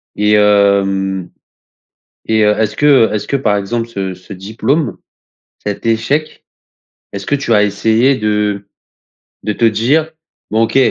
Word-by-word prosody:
Et 105 0 +2
hem, 100 -3 +2 1.0
et 110 -1 +2
heu, 105 - +4
est-ce 110 -1 -1
que, 145 - 0 0.2
heu - - -6
est-ce 105 - -3
que, - - -1
par 105 -6 +1
exemple, 115 +4 -3
ce 95 -4 -4
ce 90 +3 -12
diplôme, 110 - -2 0.7
cet 105 +1 -5
échec, 115 +7 -1 0.7
est-ce - - -7
que - - 0
tu 140 -4 -1
as 105 - +4
essayé 110 +6 +2
de 105 -2 -1 0.8
de 105 - -1
te 115 - +1
dire: 130 +9 +1 0.4
«Bon, 110 +1 +2
OK 115 - 0
105 Hz, 150 wpm, -15 LUFS, 100-115 Hz, 1.0 s, heu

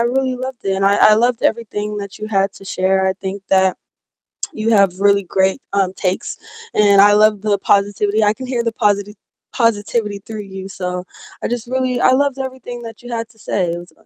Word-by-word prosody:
really 255 +2 0
loved 260 0 -5
it 195 -1 0
and 195 - 0
I 200 +1 +4 0.2
I - - +7
loved 240 +1 +1
everything 210 -2 -1
that 200 -1 -7
you 215 - -5
had 195 -2 +1
to 195 - -14
share. 190 0 +1
I 190 - +1
think 195 +1 -6
that 190 -1 +3 0.8
you 220 +1 -2
have 195 -4 +3
really 200 0 +4
great, 190 +4 +1
um, 195 -2 +1
takes, 185 -1 -2 0.4
and 200 -2 +5
I 205 +1 +7
love 210 -1 +4
the 210 -1 +1
positivity. 205 +2 +1
I 210 0 +3
can 255 +3 -8
hear 245 -2 -1
the 230 - 0
positi 205 -2 0 0.4
positivity 210 -3 0
through 215 -2 -6
you, 190 -1 -8
so 180 -1 -4 0.4
I - - -1
just 240 -1 -3
really 255 -1 -1
I - - +4
loved 275 +1 +2
everything 255 -2 -6
that 225 0 -10
you 245 - -8
had 230 -1 -3
to 225 - -24
say, 185 -4 -1
it 170 - -3
was 175 +1 -11
205 Hz, 210 wpm, -18 LUFS, 195-235 Hz, 0.8 s, I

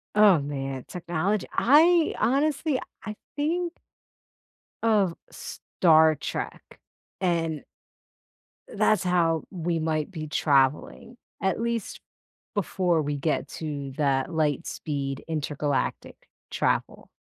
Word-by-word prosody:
Oh, 210 -5 +7
man, 135 -2 -4
technology 180 +3 -2
I 320 +6 +5
honestly 280 +1 +1 0.2
I 215 0 -5 0.2
think 340 +4 -1 1.1
of 205 -6 +3 0.2
Star 160 -2 +3
Trek, - - -5 0.6
and 165 -4 0 1.1
uh, - - -9
that's 215 -4 +3
how 170 -3 +2
we 170 -2 -2
might 155 +2 -1
be 155 -3 -6
traveling, 145 - +1 0.2
at 190 +1 0
least 230 -2 -2 0.5
before 180 -4 +1
we 145 0 -2
get 150 +2 -1
to 145 -4 -5
that 140 +2 +1
light 155 0 0
speed 140 -3 -4
intergalactic 150 -2 -2 0.3
travel. - - -1
165 Hz, 100 wpm, -26 LUFS, 150-210 Hz, 1.1 s, Oh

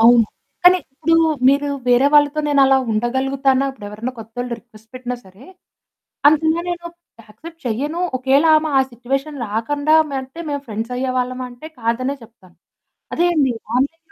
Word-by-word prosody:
అవును. 230 0 +7 0.4
కానీ 365 +1 +8 0.2
ఇప్పుడు 320 +4 +1 0.3
మీరు 285 +1 +2 0.2
వేరే 245 +3 +5
వాళ్ళతో 295 +1 +4
నేనలా 270 -2 +5
ఉండగలుగుతానా? 265 +4 +1
ఇప్పుడెవరైనా 215 0 -7
కొత్తోళ్ళు 235 +2 -6
రిక్వెస్ట్ 220 -1 -20
పెట్టినా 250 -1 -4
సరే, 190 +6 -17 0.8
అందుకని 310 +1 +4 0.2
నేను 345 0 -5 0.4
యాక్సెప్ట్ 320 +11 -13
చేయను. 290 +9 -2 0.2
ఒకవేళ 270 +4 +3
ఆమె 310 0 0
ఆ - - +6
సిట్యుయేషన్ 270 +4 -3
రాకుండా 285 +9 0 0.3
ఉంటే 265 +6 -11
మేము 285 -1 -3
ఫ్రెండ్స్ 225 +3 -4
అయ్యేవాళ్ళమా 255 0 -2
అంటే, 245 +6 -11
కాదనే 245 +4 -1
చెప్తాను. 215 -6 -19 0.6
అదే 345 - +2
అండి. 275 -5 +2 0.2
ఆన్‌లైన్‌ 280 +6 0
260 Hz, 135 wpm, -19 LUFS, 235-290 Hz, 0.8 s, కానీ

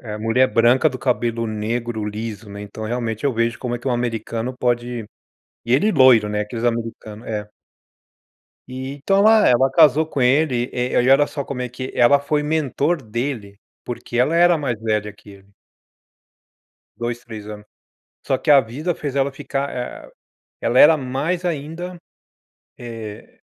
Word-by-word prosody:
ah, 105 -3 -7
mulher 115 +4 +3
branca, 120 +6 +4
do 130 - -7
cabelo 115 -2 -1
negro 110 +1 -3
liso, 105 0 -6
né, 100 0 -8
então 105 +2 -8
realmente, 115 0 -3
eu 140 - +2
vejo 115 0 -1
como 120 -1 -3
é - - -3
que 120 - -12
o - - 0
americano 120 0 -2
pode 120 -1 -1 0.6
e 120 - +1
ele 210 +11 +3
loiro, 130 -7 +5
né, 105 0 -1
aqueles 115 +2 -5
americano 115 -1 -4
é. 105 -1 -4 1.2
E 130 +1 -6
então 195 +8 0
ela 215 +1 +6
ela 130 +2 +4
casou 155 -1 +5
com 140 -4 -3
ele, 125 -1 +2
eh, 125 0 0
e 130 - +2
olha 140 +2 +6
só 140 -2 -5
como 125 -2 -5
é 125 - -3
que 130 +1 -6
ela 125 +4 +5
foi 150 +1 -1
mentor 150 +1 0
dele, 110 -3 -5 0.2
porque 120 0 -6
ela 140 +7 +2
era 175 -1 +5
mais 125 -7 -3
velha 105 -2 -1
que 105 0 -18
ele. 100 0 -18 1.5
2, 120 0 -3
3 110 -3 -9
ano. 105 0 -9 0.6
Só 135 - +1
que 150 - +1
a 140 -2 +8
vida 145 +10 -3
fez 140 -2 -5
ela 140 0 +1
ficar, 140 +1 -4
eh, 125 0 -7 0.5
ela 125 - +2
era 155 +1 +8
mais 145 +7 -2
ainda, 170 +3 -4 0.8
eh 115 -3 -9
125 Hz, 170 wpm, -21 LUFS, 115-140 Hz, 1.5 s, a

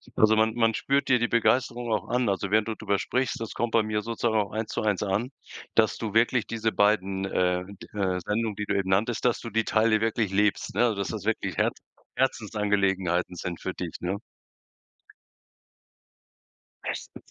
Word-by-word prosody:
Also 110 0 +5
man 110 0 +3
man 115 -1 +3
spürt 140 +1 +1
dir 125 - +6
die 120 - +1
Begeisterung 120 0 +1
auch 110 - 0
an. 125 -3 +1
Also, 100 0 -1
während 110 +1 +3
du 110 - -2
drüber 100 -2 -1
sprichst, 125 -2 -1
das 115 -1 -5
kommt 120 -1 -1
bei 115 - +4
mir 105 0 -1
sozusagen 115 0 -1
auch 100 -2 -2
eins 110 +1 -3
zu - - -2
eins 105 -4 +1
an, 105 +6 -1 0.4
dass 110 -2 +3
du 110 -3 -4
wirklich 120 +1 +3
diese 110 -1 -1
beiden, 100 -2 +2
äh, 90 -1 +1
d 100 0 -12
äh, 95 -2 0
Sendungen, 105 +2 -1
die 105 - -3
du 100 - -1
eben 95 -1 -1
nanntest, 110 +6 +1
dass 120 - +2
du 115 - -6
die 115 +1 +1
Teile 110 0 +2
wirklich 115 -3 0
lebst, 105 +1 +1
ne, 120 -2 +3
dass 100 -1 -2
das 105 -3 -5
wirklich 110 0 -1
Herz - - +1 0.4
Herzensangelegenheiten 100 -7 0
sind 85 0 -5
für - - -3
dich, - - -6
ne? 95 +3 -2 2.7
Bestens. - - -7
110 Hz, 185 wpm, -27 LUFS, 100-115 Hz, 2.7 s, dir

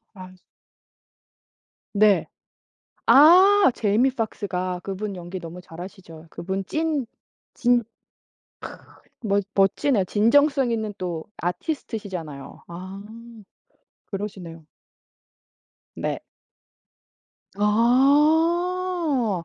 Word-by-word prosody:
아. 185 -2 -11 1.6
네. 205 -1 +4 0.8
아 370 +6 +7
Jamie 220 +5 +2
Foxx가. 185 -6 -3
그분 195 +1 -5
연기 175 +1 -7
너무 170 0 -9
잘하시죠. 170 -1 -11
그분 190 +2 -4
찐 310 -3 -1 0.5
진 245 -2 +2 0.8
크 - - -8 0.4
멋 205 -3 0
멋지네요. 195 +3 +2
진정성 265 - +3
있는 220 -2 -2
또 170 -3 -4
아티스트시잖아요. 180 - -5
아. 185 +3 -8 1.0
그러시네요. 185 -6 -7 1.3
네. - - -4 1.4
아. 295 - +2
210 Hz, 170 characters per minute, -23 LUFS, 185-275 Hz, 1.6 s, 아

